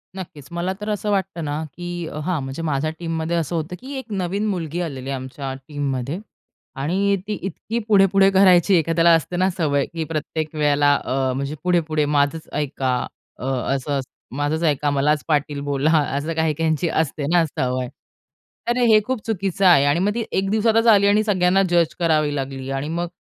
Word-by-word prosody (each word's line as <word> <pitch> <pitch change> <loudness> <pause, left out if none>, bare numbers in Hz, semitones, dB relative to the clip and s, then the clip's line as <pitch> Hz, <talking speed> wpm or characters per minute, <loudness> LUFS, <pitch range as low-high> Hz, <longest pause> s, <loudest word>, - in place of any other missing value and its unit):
नक्कीच. 155 -7 -9
मला 175 +2 -2
तर 210 - -4
असं 210 0 -2
वाटतं 190 -4 -1
ना, 150 +2 -2
की 175 -1 -5 0.2
हां 180 -3 0
म्हणजे 135 +4 -5
माझ्या 155 -1 0
टीममध्ये 165 0 -2
असं 165 +1 -2
होतं, 160 +2 -3
की 265 +6 -8
एक 255 -4 -8
नवीन 195 +1 -1
मुलगी 175 -3 -3
आलेली 135 -6 -5
आहे 140 - -1
आमच्या 130 +1 -6
टीममध्ये. 140 +1 -3 0.6
आणि 185 +9 +1
ती 215 - -1
इतकी 205 +5 -4
पुढे-पुढे 195 -2 +5
करायची 190 -1 +5
एखाद्याला 165 +1 +3
असते 165 +2 -2
ना 185 +1 +3
सवय, 150 -6 0
की 165 -1 -5
प्रत्येक 155 0 -4
वेळेला 145 -1 +3
अ, 130 -1 -1
म्हणजे 140 +3 -3
पुढे-पुढे 160 -4 +1
माझंच 145 +2 0
ऐका 135 -3 -1 0.4
अ, - - -5 0.3
असं 140 +1 -1
अस 135 - -3 0.3
माझंच 145 +3 -1
ऐका 150 -2 +1
मलाच 145 +2 +1
पाटील 145 -2 0
बोला 145 +1 0 0.3
असं 155 +4 -2
काही 160 -1 +1
काहींची 160 +2 0
असते 155 -2 -1
ना 175 -1 +4
सवय. 130 -3 -2 0.8
तर 240 - +1
हे 230 -3 +5
खूप 260 0 -2
चुकीचं 195 -3 -1
आहे 170 -6 +6
आणि 145 +3 +2
मग 205 +3 +1
ती 235 - -1
एक 195 0 0
दिवसातच 225 +2 +2
आली 200 -1 +4
आणि 210 +1 +4
सगळ्यांना 190 -2 +3
जज 170 -2 +2
करावी 155 -3 +2
लागली 135 -1 -4
आणि 135 +2 -2
मग 170 +2 -2
160 Hz, 180 wpm, -22 LUFS, 145-185 Hz, 0.8 s, आहे